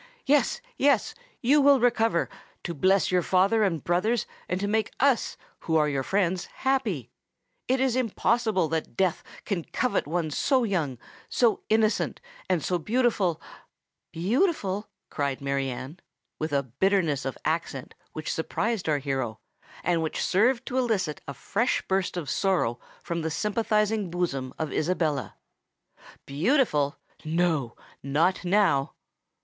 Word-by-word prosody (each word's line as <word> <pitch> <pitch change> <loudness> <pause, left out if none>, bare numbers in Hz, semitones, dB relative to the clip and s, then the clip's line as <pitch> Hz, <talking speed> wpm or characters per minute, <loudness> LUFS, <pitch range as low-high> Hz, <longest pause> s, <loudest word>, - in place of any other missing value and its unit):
"Yes—yes—you 295 - +1
will 280 -1 +6
recover, 225 -6 +2 0.4
to 170 - -3
bless 185 +6 +2
your 180 -1 +3
father 195 +6 +3
and 165 -8 0
brothers, 200 +7 +1 0.2
and 180 - 0
to 200 - -1
make 220 +1 0
us, 270 -2 +2 0.2
who 160 -1 0
are 150 -1 +3
your 140 -2 0
friends, 185 +3 0
happy! 265 0 -1 0.6
It 260 +1 +2
is 260 -2 +2
impossible 225 -5 +1
that 160 0 -3
Death 185 -3 +1 0.2
can 185 -5 -2
covet 250 - -1
one 165 0 -1
so 260 - +2
young, 165 - -1 0.3
so 235 -3 +2
innocent, 220 0 +2 0.3
and 175 -5 +1
so 180 -1 0
beautiful——" 210 -4 +1 0.7
"Beautiful!" 205 - 0 0.2
cried 140 -2 -1
Mary 140 -1 -1
Anne, 130 +7 -7 0.4
with 155 0 -2
a 140 -1 +1
bitterness 155 - +1
of 135 - -4
accent 155 -5 -2 0.2
which 155 - -3
surprised 200 +3 -1
our 150 - +3
hero, 135 -5 -3 0.4
and 170 -1 +1
which 160 - -2
served 240 +6 +2
to 260 -1 -1
elicit 200 - 0
a 140 - -6
fresh 225 - 0
burst 190 -1 0
of 165 -5 -4
sorrow 165 - +1 0.2
from 170 0 -3
the 160 - -1
sympathising 210 +2 0
bosom 150 -7 -2
of 155 -2 -3
Isabella: 155 - -1 0.9
"beautiful—no, 155 - 0 0.3
not 155 +8 +1
now!" 175 -7 +2
180 Hz, 135 wpm, -27 LUFS, 155-225 Hz, 0.9 s, will